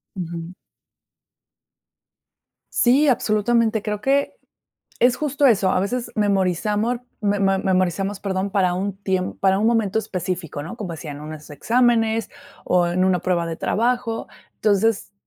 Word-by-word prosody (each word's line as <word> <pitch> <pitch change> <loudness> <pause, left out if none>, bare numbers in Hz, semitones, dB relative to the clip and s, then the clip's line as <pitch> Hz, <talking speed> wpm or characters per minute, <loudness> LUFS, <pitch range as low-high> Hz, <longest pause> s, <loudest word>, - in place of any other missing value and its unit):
Ujú. 170 -1 -6 2.2
Sí, 265 +5 +4
absolutamente. 225 -2 +2
Creo 210 0 -3
que 275 +3 +1 0.7
es 245 0 +4
justo 290 0 0
eso, 205 -7 +4
a - - +2
veces 235 +5 -2
memorizamor, 210 +3 0 0.2
memo 200 -2 +2
memorizamos, 190 +1 0
perdón, 190 0 -2
para 190 -3 +2
un 195 +2 -3
tiem 190 -2 -1
para 190 0 +2
un 215 - +1
momento 220 -3 +1
específico, 180 -6 -4
¿no?, 170 +9 -7
como 205 -7 -6
decía, 155 -1 -7
en 145 +1 -8
unos 155 0 -9
exámenes 225 +5 +1 0.4
o 180 -1 +3
en 180 +2 +1
una 185 -1 +2
prueba 175 -1 0
de 165 -1 -4
trabajo. 235 +3 -1 0.3
Entonces, 210 0 +1
200 Hz, 135 wpm, -22 LUFS, 185-225 Hz, 2.2 s, Sí